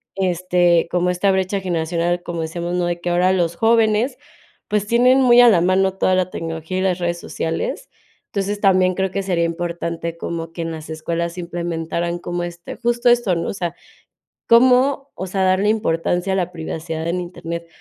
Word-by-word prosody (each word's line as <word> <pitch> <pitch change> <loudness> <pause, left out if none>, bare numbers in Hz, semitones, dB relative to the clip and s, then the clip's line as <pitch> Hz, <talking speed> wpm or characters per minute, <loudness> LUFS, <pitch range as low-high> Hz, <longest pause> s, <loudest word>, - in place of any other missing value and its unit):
este, 180 -2 +2
como 180 0 +1
esta 180 +2 +1
brecha 190 +1 0
generacional, 175 -1 -1
como 170 -1 -4
decíamos, 170 +2 -4
¿no? 180 -1 0
De 175 0 -2
que 175 - -2
ahora 180 +2 +3
los 170 -2 0
jóvenes, 225 +2 +2 0.5
pues, 210 -1 0
tienen 250 +3 +4
muy 245 -1 +7
a 245 - +8
la 180 - +4
mano 190 +1 +2
toda 185 -1 +2
la 185 -1 +1
tecnología 165 +1 -5
y - - 0
las 185 -1 +1
redes 175 0 -2
sociales. 165 - -4 0.4
Entonces, 205 +1 -3
también 185 -2 +3
creo 190 -1 -1
que 195 0 -2
sería 180 -3 0
importante 170 -1 -3
como 165 -1 -5
que 170 - -5
en 165 - -4
las 160 -1 -8
escuelas 170 +2 -3
implementaran 170 0 -3
como 175 0 -4
este, 175 0 -8
justo 240 0 +1
esto, 240 -7 +3
¿no? 170 - -2
O - - -3
sea, 175 -3 -4 0.7
cómo, 255 +3 +4
o 190 - -5
sea, 190 +1 -1
darle 185 +2 +2
importancia 175 -3 0
a - - +1
la 180 -1 -1
privacidad 160 0 -5
en 175 +2 -1
Internet, 170 -1 -6
175 Hz, 185 wpm, -20 LUFS, 170-195 Hz, 0.7 s, a